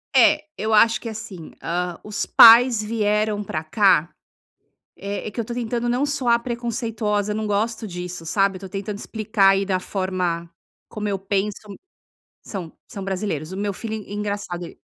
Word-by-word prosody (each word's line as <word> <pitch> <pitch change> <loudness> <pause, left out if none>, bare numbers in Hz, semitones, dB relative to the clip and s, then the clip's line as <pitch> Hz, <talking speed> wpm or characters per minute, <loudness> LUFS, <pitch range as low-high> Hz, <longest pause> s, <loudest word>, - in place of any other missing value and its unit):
É, 300 +4 +5
eu 220 0 -2
acho 225 +2 +5
que 230 - -7
é - - -3
assim, 190 -6 -9
hã, 175 0 -2
os 210 0 -3
pais 230 -1 +8
vieram 210 -1 0
pra 155 -4 -4
cá, 175 -2 +3 0.9
eh, 200 +2 -5
é - - -5
que 235 - -7
eu 225 - -1
tô 235 - -5
tentando 240 0 -2
não 250 +3 +1
soar 255 -5 +1
preconceituosa, 230 -4 -2
eu - - -2
não 215 0 -2
gosto 220 +2 -1
disso, 180 -2 -6
sabe, 195 +3 +1
eu 185 - -9
tô 190 - -8
tentando 200 +1 -5
explicar 215 -2 +1
aí 195 0 +2
da 185 -1 +1
forma 180 -3 -2 0.4
como 210 -1 -4
eu 195 -2 -1
penso. 195 +1 -1 0.9
São, 180 -6 -6 0.2
são 195 - -7
brasileiros, 185 -5 -3
o 190 - -6
meu 200 -1 -2
filho 220 +2 -5
en 210 -2 -8
engraçado 205 -4 -4
el - - -10
205 Hz, 180 wpm, -22 LUFS, 190-225 Hz, 0.9 s, pais